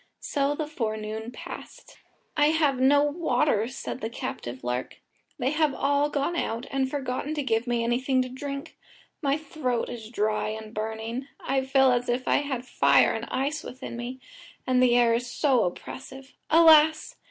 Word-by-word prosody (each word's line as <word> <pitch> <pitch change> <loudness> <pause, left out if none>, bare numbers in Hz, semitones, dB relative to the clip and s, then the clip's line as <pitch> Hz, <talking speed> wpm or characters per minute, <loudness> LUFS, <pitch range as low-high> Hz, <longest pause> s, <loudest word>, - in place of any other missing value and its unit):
So 285 0 0
the 310 - -2
forenoon 220 -5 -4
passed. - - -10 0.4
"I 295 -1 +4
have 300 -4 +2
no 285 +2 +5
water," 295 -7 +1
said 255 0 -6
the 220 - -2
captive 125 - -6
lark, 125 +1 -3 0.4
"they 260 -1 0
have 305 -3 +1
all 285 +1 +2
gone 290 +4 -1
out, 230 -7 -2
and 270 -1 0
forgotten 275 +2 -3
to 295 - -1
give 225 -2 0
me 240 -1 0
anything 255 +3 +1
to - - -5
drink. 275 +2 -7 0.4
My 280 -1 +1
throat 280 -6 -2
is 225 -2 -7
dry 215 -2 0
and 220 0 -7
burning. 220 +4 -4
I 265 0 0
feel 265 0 +4
as 245 0 0
if 245 +1 -1
I - - +4
had 270 -4 -3
fire - - +4
and - - -4
ice 285 +4 -1
within 260 -1 -7
me, 240 +2 -6 0.5
and 255 -1 +3
the 245 -1 +5
air 235 -1 +4
is 240 +1 -1
so 260 -3 +2
oppressive. 265 +8 -7 0.2
Alas! 315 -1 +6
260 Hz, 170 wpm, -26 LUFS, 235-285 Hz, 0.5 s, Alas